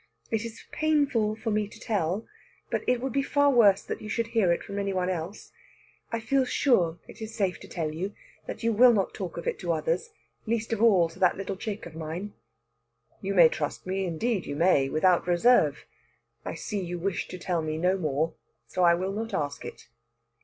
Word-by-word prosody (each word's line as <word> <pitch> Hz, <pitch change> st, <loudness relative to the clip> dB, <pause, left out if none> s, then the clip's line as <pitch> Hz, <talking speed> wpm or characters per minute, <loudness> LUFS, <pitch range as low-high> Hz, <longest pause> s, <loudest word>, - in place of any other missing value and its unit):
It 225 Hz, -1 st, 0 dB
is 230 Hz, -1 st, -8 dB
painful 285 Hz, -9 st, +1 dB
to 225 Hz, -, 0 dB
me 210 Hz, 0 st, +1 dB
to 215 Hz, -, -14 dB
tell, 200 Hz, -2 st, -1 dB, 0.5 s
but -, -, 0 dB
it 250 Hz, -1 st, +3 dB
would 265 Hz, -2 st, -3 dB
be 275 Hz, -, +2 dB
far 285 Hz, +1 st, +3 dB
worse 210 Hz, -6 st, +5 dB
that -, -, -5 dB
you 215 Hz, -, -7 dB
should 230 Hz, +1 st, -1 dB
hear 205 Hz, -7 st, +3 dB
it 170 Hz, -, 0 dB
from 200 Hz, 0 st, -5 dB
any 200 Hz, -1 st, -1 dB
one 185 Hz, 0 st, 0 dB
else. 175 Hz, +3 st, -6 dB, 0.6 s
I 230 Hz, -, -1 dB
feel 265 Hz, +5 st, +2 dB
sure 185 Hz, -, +2 dB
it -, -, -13 dB
is 220 Hz, 0 st, -6 dB
safe 195 Hz, -4 st, 0 dB
to -, -, -12 dB
tell 160 Hz, -3 st, -3 dB
you; 190 Hz, +6 st, -4 dB, 0.3 s
that -, -, -6 dB
you 230 Hz, 0 st, +2 dB
will 240 Hz, +3 st, +7 dB
not 195 Hz, -4 st, 0 dB
talk 180 Hz, -4 st, -6 dB
of 170 Hz, -, -5 dB
it -, -, -1 dB
to 175 Hz, -2 st, -1 dB
others 165 Hz, +2 st, -1 dB, 0.4 s
least 230 Hz, 0 st, -1 dB
of 220 Hz, -, -2 dB
all 195 Hz, -7 st, +5 dB
to 165 Hz, -, -15 dB
that 180 Hz, -2 st, +3 dB
little 195 Hz, 0 st, -4 dB
chick 205 Hz, +2 st, -5 dB
of 170 Hz, -, -9 dB
mine." 165 Hz, +6 st, -5 dB, 0.9 s
"You 195 Hz, 0 st, -2 dB
may 170 Hz, -3 st, +9 dB
trust 150 Hz, -2 st, -4 dB
me 190 Hz, +1 st, -1 dB
indeed, 190 Hz, +4 st, -1 dB
you 145 Hz, -, -3 dB
may 150 Hz, -4 st, +3 dB
without 175 Hz, +4 st, +3 dB
reserve. 175 Hz, -, +3 dB, 0.6 s
I -, -, -5 dB
see 205 Hz, -3 st, -3 dB
you 175 Hz, 0 st, -4 dB
wish 180 Hz, +2 st, -2 dB
to 180 Hz, -, -7 dB
tell 175 Hz, -1 st, -1 dB
me 155 Hz, 0 st, -3 dB
no 180 Hz, +3 st, +2 dB
more, 160 Hz, -2 st, -1 dB, 0.3 s
so 185 Hz, -, -3 dB
I 170 Hz, -1 st, +6 dB
will 185 Hz, +2 st, -2 dB
not 225 Hz, +3 st, -3 dB
ask 145 Hz, -1 st, -2 dB
it." -, -, -9 dB
195 Hz, 215 wpm, -27 LUFS, 170-225 Hz, 0.9 s, may